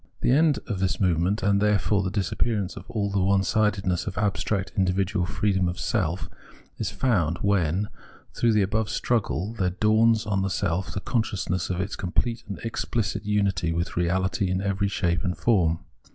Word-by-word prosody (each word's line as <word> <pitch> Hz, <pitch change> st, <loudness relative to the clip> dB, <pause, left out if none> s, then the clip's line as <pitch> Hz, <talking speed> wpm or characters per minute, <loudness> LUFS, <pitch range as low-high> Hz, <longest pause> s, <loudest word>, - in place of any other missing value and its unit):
The -, -, +2 dB
end 150 Hz, +1 st, +4 dB
of 105 Hz, -5 st, -3 dB
this 95 Hz, 0 st, 0 dB
movement, 90 Hz, +2 st, +1 dB
and 100 Hz, 0 st, +3 dB
therefore 105 Hz, -1 st, +2 dB
the 95 Hz, -, -1 dB
disappearance 100 Hz, 0 st, -1 dB
of 95 Hz, -, -11 dB
all 100 Hz, -3 st, -1 dB
the 100 Hz, -, +1 dB
onesidedness 95 Hz, -1 st, +1 dB
of 100 Hz, -, -4 dB
abstract 100 Hz, -2 st, -1 dB
individual 95 Hz, 0 st, +1 dB
freedom 95 Hz, +1 st, +1 dB
of 90 Hz, -, -5 dB
self, 90 Hz, -6 st, -1 dB, 0.5 s
is -, -, -1 dB
found 90 Hz, -11 st, +1 dB
when, 100 Hz, -1 st, +1 dB, 0.5 s
through 115 Hz, -1 st, +2 dB
the 105 Hz, -2 st, +4 dB
above 110 Hz, +2 st, -1 dB
struggle, 105 Hz, -, -1 dB
there 95 Hz, -5 st, 0 dB
dawns 110 Hz, +3 st, +3 dB
on 100 Hz, -2 st, 0 dB
the 95 Hz, -, 0 dB
self 90 Hz, -1 st, -1 dB
the 95 Hz, -, -4 dB
consciousness 100 Hz, -6 st, -1 dB
of 90 Hz, -1 st, -2 dB
its 95 Hz, +3 st, -2 dB
complete 115 Hz, +5 st, -1 dB
and 100 Hz, -, -5 dB
explicit 115 Hz, -1 st, -2 dB
unity 100 Hz, -5 st, +1 dB
with 85 Hz, +1 st, -2 dB
reality 95 Hz, +3 st, 0 dB
in 95 Hz, 0 st, 0 dB
every 100 Hz, +1 st, 0 dB
shape 90 Hz, -3 st, 0 dB
and 90 Hz, -2 st, -2 dB
form. 90 Hz, -9 st, +2 dB
100 Hz, 170 wpm, -25 LUFS, 90-105 Hz, 0.5 s, end